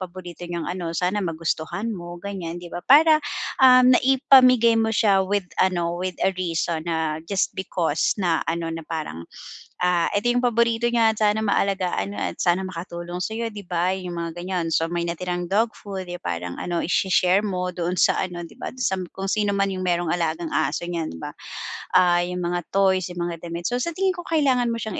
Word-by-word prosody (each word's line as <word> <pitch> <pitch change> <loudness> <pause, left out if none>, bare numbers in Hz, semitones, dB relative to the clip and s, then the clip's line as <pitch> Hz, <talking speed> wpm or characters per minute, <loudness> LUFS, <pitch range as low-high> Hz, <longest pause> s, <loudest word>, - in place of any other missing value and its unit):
paborito 180 -1 -8
niyang 170 -2 -3
ano, 175 -2 -3
sana 185 +3 0
magustuhan 165 +6 -2
mo, 175 -1 -8
ganiyan." 175 -3 -5
'Di 175 -1 -11
ba? 175 - -4
Para, 310 +3 +7 0.4
um, 255 -1 +7
naipamigay 255 -3 +5
mo 220 - +1
siya 205 -3 +3
with 200 0 -1 0.2
ano 175 -2 +1
with 185 0 -3
a 195 - +3
reason 165 -2 -1
na 160 -1 -1
just 195 -2 0
because 170 -4 0
na, 170 -4 +1
ano, 165 0 -3
na 165 - -5
parang, 150 - -5 0.6
"Ah, 180 -2 +2
ito 205 +4 +1
'yong 245 +1 0
paborito 235 0 +2
niya. 230 -2 +3
Sana 215 0 +2
maalagaan 190 - 0
mo 100 - -5
at 85 - -3
sana 175 +1 +2
makatulong 175 0 -6
sa 220 - -4
'yo." 230 0 -2
'Di 205 -2 -9
ba? 175 +1 0
'Yong 180 -2 -6
mga 170 -1 -4
ganiyan, 175 -1 -2
so 165 - +2
may 175 0 -2
natirang 175 +1 -3
dog 220 +3 +2
food, 195 -2 -7
eh, 175 - -6
parang, 85 0 -4
ano, 175 -1 -2
isi-share 185 +2 +2
mo 180 -3 -2
doon 180 +1 -2
sa - - +5
ano, 175 -1 -3
'di 170 - -12
ba - - -5
do'n 255 - -5
sa 190 - +1
m 180 - -5
kung 195 0 -4
sino 205 -2 +1
man 195 0 +1
'yong 185 - -4
mayro'n 175 -2 0
alagang 165 -1 -1
aso 155 - 0
niyan, 170 -2 -3
'di 80 - -9
ba? - - -5 0.6
Ah, 175 -1 +5
'yong 180 0 -4
mga 175 -1 -2
toys, 190 -2 +3
'yong - - -9
mga 170 - -4
damit. 170 +1 -5
So 245 +1 -1
sa 340 - -1
tingin 385 0 +2
ko 350 - -8
kailangan 270 -7 +2
mo - - -1
siyang 215 -3 -4
180 Hz, 205 wpm, -23 LUFS, 170-210 Hz, 0.6 s, Para